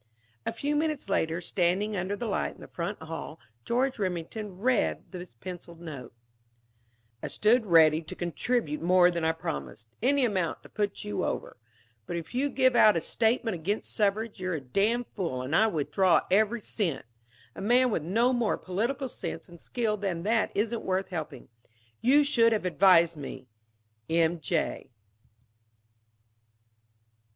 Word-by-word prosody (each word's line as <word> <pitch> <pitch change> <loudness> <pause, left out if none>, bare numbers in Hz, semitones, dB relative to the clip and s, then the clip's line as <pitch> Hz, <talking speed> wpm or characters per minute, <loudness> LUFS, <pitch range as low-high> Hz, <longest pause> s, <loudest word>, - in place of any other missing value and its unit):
A - - +1
few 290 +1 -2
minutes 305 -6 -1
later, 165 -3 0
standing 185 +4 0
under 190 +2 -2
the 240 - -5
light 210 - -1
in - - -17
the - - -10
front 180 +4 -4
hall, 160 -1 -7 0.2
George 255 - 0
Remington 185 +2 -4
read 245 +2 0
this 180 -8 -9
penciled 170 +4 -9
note: 145 -8 -8 1.1
"I - - -3
stood 220 +1 +2
ready 160 -2 +6
to 160 - -9
contribute 175 -1 -1
more 180 +1 +5
than 170 -1 -3
I 160 - +3
promised 70 - -6
any 270 +2 +3
amount 185 -7 -1
to - - -14
put 205 -1 -2
you 105 -1 -3
over. - - -3 0.5
But - - -3
if 165 +5 -7
you 270 +3 +1
give 260 -1 +3
out 215 -5 +6
a - - +2
statement 225 +4 +1
against 180 +5 -3
suffrage 210 +1 0
you're 185 -2 -2
a - - -2
damn 200 - 0
fool 165 - -4
and 135 +5 -1
I 220 - +5
withdraw 180 +1 +2
every 215 +4 +3
cent. 175 - -2 0.5
A - - -8
man 245 +4 +3
with 185 - 0
no 230 - +2
more 240 -3 +1
political 240 +9 -2
sense - - -6
and 170 -1 -13
skill 225 -3 -1
than 190 -5 -3
that 225 +2 +1
isn't 220 +3 0
worth 190 +1 -1
helping. 155 -7 -6 0.5
You 280 +5 +5
should 230 -5 +4
have 210 -4 -1
advised 170 -2 +5
me. 140 -2 -7 0.6
"M. 165 +1 +2
J." 160 -3 -2
195 Hz, 160 wpm, -28 LUFS, 165-230 Hz, 1.1 s, ready